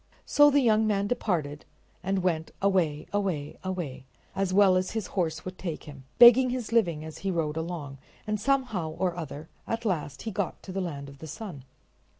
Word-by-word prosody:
So 290 0 +6
the 285 0 +4
young 220 -3 +3
man 200 -1 +1
departed 165 -10 -1 0.4
and 190 +1 -1
went 165 -3 0
away, 180 -7 +1
away, 185 -8 -2
away, 170 -9 -4 0.3
as 195 -1 0
well 195 -1 +5
as 185 0 0
his 215 - -2
horse 160 -4 -1
would 185 0 -7
take 170 -5 -4
him, 140 -3 -11
begging 245 +1 +9
his 245 -3 -3
living 170 -10 +2
as 160 - -9
he 195 - -2
rode 160 -4 -1
along, 160 -5 -5 0.3
and 215 0 -1
somehow 235 -10 0
or 180 -2 0
other 155 -2 -6 0.2
at 230 +1 -3
last 150 -8 -2
he 225 - -3
got 195 -2 -3
to 190 - -8
the 190 +1 -2
land 145 -6 -5
of 140 0 -13
the 160 - -8
sun. 160 - -8
185 Hz, 190 wpm, -28 LUFS, 155-210 Hz, 0.4 s, begging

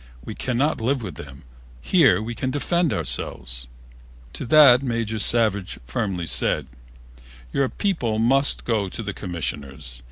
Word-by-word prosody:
We - - -6
cannot 130 +2 -1
live 125 +2 0
with 95 -5 -6
them. 70 -2 -11 0.4
Here 110 - +3
we 120 +2 -5
can 130 +2 -3
defend 155 +5 0
ourselves." - - -2 0.7
To - - -6
the 135 -3 +7
Major 115 -4 -2
Savage 105 -4 +2
firmly 95 - -3
said, 75 -2 +2 0.9
"Your 135 -2 +1
people 130 - -1
must 135 +5 +2
go 105 -5 0
to 115 - -6
the 105 -1 -4
Commissioners. 70 - -6
115 Hz, 135 wpm, -23 LUFS, 90-130 Hz, 0.9 s, the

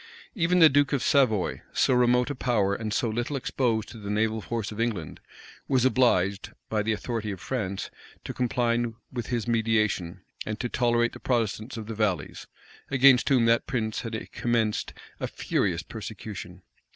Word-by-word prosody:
Even 180 -3 +2
the 165 -3 +9
duke 145 -1 +2
of 135 - +1
Savoy, 115 -9 +2
so - - +3
remote 125 +2 +3
a - - -1
power, 115 -7 +1
and 110 +1 -3
so 115 - +1
little 120 +6 -2
exposed 120 -4 0
to 115 - -10
the 100 -1 -7
naval 110 +1 0
force 110 -1 -3
of 105 +1 -4
England, 105 -10 -3 0.5
was 130 -2 +2
obliged, 100 -7 +2 0.2
by 110 -1 +1
the 110 +2 0
authority 110 0 -3
of 95 -3 -5
France, 100 -6 -3 0.3
to - - -5
comply 120 -1 +1 0.3
with 120 -2 -4
his 120 -3 -2
mediation, 110 -6 0 0.2
and 105 0 -4
to 125 - -2
tolerate 120 -1 +1
the - - -9
Protestants 115 -1 -1
of 110 - -5
the 115 - -5
valleys, 100 -8 -2 0.4
against 135 -1 +5
whom 130 -4 +4
that 115 0 +3
prince 110 -5 -2
had 115 -1 -6
commenced 115 -3 0 0.3
a - - -2
furious 90 -3 -1
persecution. 100 -2 -8
115 Hz, 170 wpm, -27 LUFS, 105-125 Hz, 0.5 s, the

